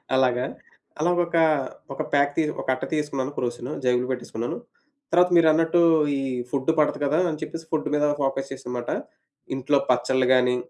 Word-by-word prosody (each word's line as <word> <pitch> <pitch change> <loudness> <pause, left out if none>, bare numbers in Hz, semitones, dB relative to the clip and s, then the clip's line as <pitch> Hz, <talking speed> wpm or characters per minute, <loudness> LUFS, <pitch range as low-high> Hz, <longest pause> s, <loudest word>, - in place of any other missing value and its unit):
అలాగా. 125 -1 +2 0.5
అలా 170 +3 +2
ఒక 170 0 -5 0.6
ఒక - - -4
ప్యాక్ 140 0 +3
తి 165 - +3 0.2
ఒక - - -10
అట్ట - - -9
తీసేసుకున్నాను 145 -3 -2
క్రోసిను. 120 +2 -3
జేబులో 125 0 +1
పెట్టేసుకున్నాను. 120 -2 -4 0.5
తర్వాత 180 +1 +5
మీరన్నట్టు 165 +1 +4 0.4
ఈ - - -2 0.3
ఫుడ్ 140 +3 +1
పడదు 150 - +2
కదా! 150 +3 +1
అని 155 -2 -4
చెప్పేసి 165 0 -6
ఫుడ్ 155 -1 -1
మీద 150 - +2 0.2
ఫోకస్ 135 0 -1
చేశా 135 - -8
అన్నమాట. 120 -1 -4 0.7
ఇంట్లో 135 +2 +1
పచ్చడ్లు 130 +1 +2
గాని 125 -1 +3
135 Hz, 155 wpm, -24 LUFS, 125-155 Hz, 0.7 s, తర్వాత